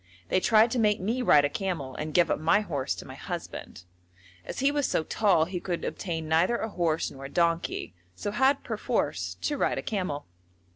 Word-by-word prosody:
They - - +3
tried 220 +3 +4
to 245 - 0
make 210 -1 +3
me 225 +7 -1
ride 150 -11 +5
a - - +3
camel 165 -8 -3
and 155 +3 -4
give 170 0 +3
up - - 0
my 165 +7 +3
horse 140 - -2
to 90 - -9
my - - -9
husband. 90 - -7 0.6
As - - -7
he 275 +2 +3
was 290 -1 +1
so - - 0
tall, 180 -3 +3
he 180 +1 -4
could 175 -1 -3
obtain 165 -4 -4
neither 165 +9 +3
a 220 - -3
horse 170 -5 0
nor 135 0 -9
a - - -6
donkey, 170 - 0 0.2
so 205 - -3
had 265 +5 +2
perforce 90 - -2
to 295 - -1
ride - - +1
a - - -3
camel. 180 -9 -3
180 Hz, 205 wpm, -28 LUFS, 155-220 Hz, 0.6 s, ride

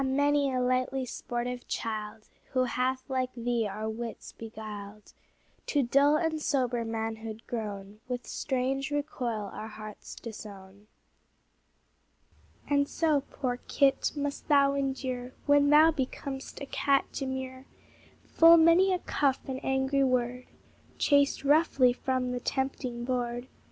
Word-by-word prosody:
many 285 +1 +2
a 255 - 0
lightly 255 +1 0
sportive 245 +1 -4
child, 215 -1 -4 0.3
Who 255 -1 +3
hath 255 +1 -1
like 260 -2 -1
thee 235 -2 0
our 215 +2 -4
wits 225 +1 -6
beguiled, 215 -2 -9 0.5
To 290 -2 +2
dull 280 +4 +4
and 315 -1 0
sober 250 -5 0
manhood 225 0 -4
grown, 205 -3 -5
With 250 -1 -4
strange 270 +1 -1
recoil 250 -8 -3
our 215 - -6
hearts 215 -1 -9
disown. 205 -3 -10 1.8
And 285 0 +2
so, 310 -4 +2
poor 250 -3 -2
kit! 275 -1 +2
must 285 -1 -3
thou 280 -2 +5
endure, 260 -2 -3
When 285 0 +5
thou 310 +2 +7
becom'st 270 -1 -5
a - - -3
cat 275 0 +2
demure, 260 -1 -5 0.6
Full 330 +1 +7
many 335 +4 +6
a 365 - +2
cuff 280 -6 0
and 265 -1 -5
angry 265 +1 +1
word, 250 -1 0 0.5
Chased 285 -1 +3
roughly 280 -4 +4
from 255 0 -1
the 250 - -2
tempting 255 -2 -2
board. 245 -1 -2
255 Hz, 125 wpm, -29 LUFS, 235-280 Hz, 1.8 s, thou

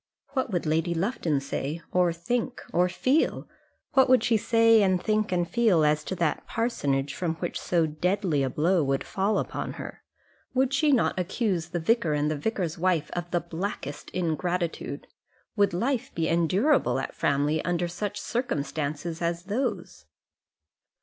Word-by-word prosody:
What 260 -3 -2
would 175 -3 -1
Lady 165 +3 +1
Lufton 170 - 0
say, 140 +3 -3
or 180 -1 +3
think, 235 +9 -2
or 180 +2 +3
feel? 265 - +1 0.5
What 265 -2 +5
would 255 -1 +5
she 230 - +3
say, 225 0 +5
and 185 -2 +3
think, 215 +1 0
and 175 -1 +1
feel 210 -9 +3
as 150 0 +2
to 190 - -3
that 170 -3 -1
parsonage 145 - -1
from 165 0 -2
which 170 +1 -4
so 170 -2 +2
deadly 160 0 0
a 135 - +1
blow 165 +6 +2
would 135 0 0
fall 200 +2 0
upon - - -3
her? - - -8 0.5
Would 260 +1 +2
she 295 +1 +3
not 245 -7 +2
accuse 185 -1 -1
the 175 - -2
vicar 170 -2 +2
and 150 +1 +1
the - - 0
vicar's 175 0 -2
wife 180 -3 +1
of 175 0 -4
the 175 -1 0
blackest 165 -4 -5
ingratitude? 170 -3 -2 0.5
Would 200 -2 +3
life 235 +8 -1
be 165 -1 0
endurable 185 - +2
at 135 - -3
Framley 145 +2 +1
under 175 0 0
such 205 +4 -4
circumstances 160 - -3
as 170 0 -1
those? 210 - -3
175 Hz, 160 wpm, -27 LUFS, 160-215 Hz, 0.5 s, What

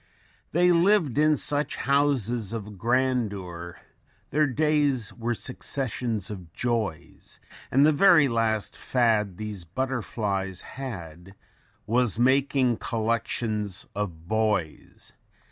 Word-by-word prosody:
They 175 +2 +4
lived 170 - +3
in 155 0 +4
such 145 +1 0
houses 125 -6 0
of 105 -3 -7
grandeur, 105 -8 -1 0.5
Their 150 0 +3
days 140 -5 +1
were 120 +2 -2
successions 120 -4 -2
of 90 -5 -9
joys, 115 -9 -3 0.3
And 135 +3 +4
the 155 - +5
very 155 -1 +6
last 115 -3 0
fad 110 -7 +1
these 105 -4 -6
butterflies 100 -3 -3
had 95 -8 -8 0.5
WAS 120 -1 +2
MAKING 130 -1 +2
COLLECTIONS 110 -3 -2
OF 85 -6 -5
BOYS. 105 -6 -2
115 Hz, 100 wpm, -26 LUFS, 100-135 Hz, 0.5 s, very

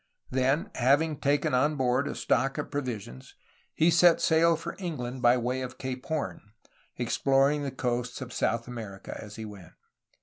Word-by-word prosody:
Then, 130 +4 +1
having 145 +5 +2
taken 145 -1 +1
on 150 +4 +3
board 130 +1 +1
a - - -4
stock 135 0 +1
of - - -4
provisions, 115 - -5 0.4
he 165 +2 +4
set 170 0 +6
sail 165 +1 +4
for 160 - -6
England 130 -9 -4
by 120 0 +5
way 125 +2 -1
of 130 0 -6
Cape 130 0 -5
Horn, 160 -2 -3 0.6
exploring 140 +2 +2
the 140 - -2
coasts 125 -1 -2
of 130 -2 -7
South 115 +1 0
America 110 -5 -7
as 105 -1 -10
he 110 - -6
went. 100 -5 -11
130 Hz, 165 wpm, -28 LUFS, 120-145 Hz, 0.6 s, set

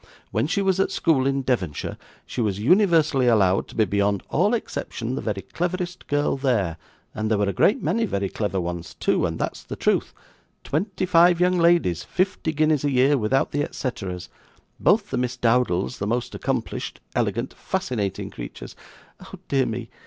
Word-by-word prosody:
'When - - +1
she 195 +5 0
was 190 -1 +2
at 195 - +2
school 140 -6 +2
in 135 0 0
Devonshire, 100 - -2 0.3
she - - -4
was 105 -4 0
universally 155 - +3
allowed 100 -5 +3
to - - -13
be 110 - +3
beyond 100 0 0
all 205 +8 +2
exception 125 - -4
the - - -3
very 100 -3 -3
cleverest 180 +1 -4
girl 145 0 +1
there, 110 - 0 0.4
and 110 0 -2
there 110 - +2
were 100 0 +1
a 100 - 0
great 210 - +3
many 225 +8 +1
very 100 - -1
clever 100 -1 -2
ones 85 -1 -5
too, - - +1
and - - -4
that's - - -3
the - - -6
truth - - +1 0.5
twenty 185 +5 -1
five 175 0 +5
young 180 0 +3
ladies, 170 - +3
fifty 185 -3 -1
guineas 155 -2 +2
a 145 - +2
year 135 +2 +4
without 135 +2 +1
the 145 - 0
et - - -4
ceteras, 95 -9 -4 0.5
both 205 0 +3
the 130 - -1
Miss 125 0 -1
Dowdles 120 -4 +1
the 100 - -2
most 120 +2 -1
accomplished, - - -3
elegant, - - -1
fascinating 105 -6 -3
creatures - - -8 0.5
Oh - - -10
dear 135 -2 +2
me! 115 0 -5
130 Hz, 180 wpm, -24 LUFS, 105-170 Hz, 0.5 s, five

